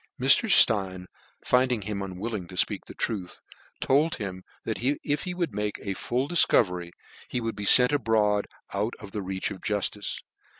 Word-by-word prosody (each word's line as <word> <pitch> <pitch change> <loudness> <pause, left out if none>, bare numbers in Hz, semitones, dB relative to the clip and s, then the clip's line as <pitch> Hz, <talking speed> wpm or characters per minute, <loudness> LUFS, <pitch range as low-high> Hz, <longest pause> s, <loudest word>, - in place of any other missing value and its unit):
Mi. 130 - -3
St 220 - +6 0.4
in, 90 -1 -10 0.4
finding 125 -3 +1
him 100 0 -5
unwilling 95 +1 -5
to 90 - -12
fpcak - - 0
the - - -11
truth, 95 -6 -4 0.4
told 150 +4 +1
him 95 -3 -6 0.2
that - - -3
if 145 +2 -1
he 180 -1 -4
would 175 -4 -3
make 105 0 -3
a 100 - -3
full 125 +7 -2
dif 175 0 +3
covery, 90 -5 +1 0.4
he - - -3
(hould 115 -2 -3
be 105 0 -4
lent 125 +1 +2
abroad, 110 -6 +1 0.3
out 105 +4 -2
of 100 -2 -11
the 105 - -4
roach 95 +1 -4
of 95 - -9
jutfice. 105 0 -3
105 Hz, 180 wpm, -26 LUFS, 100-125 Hz, 0.4 s, St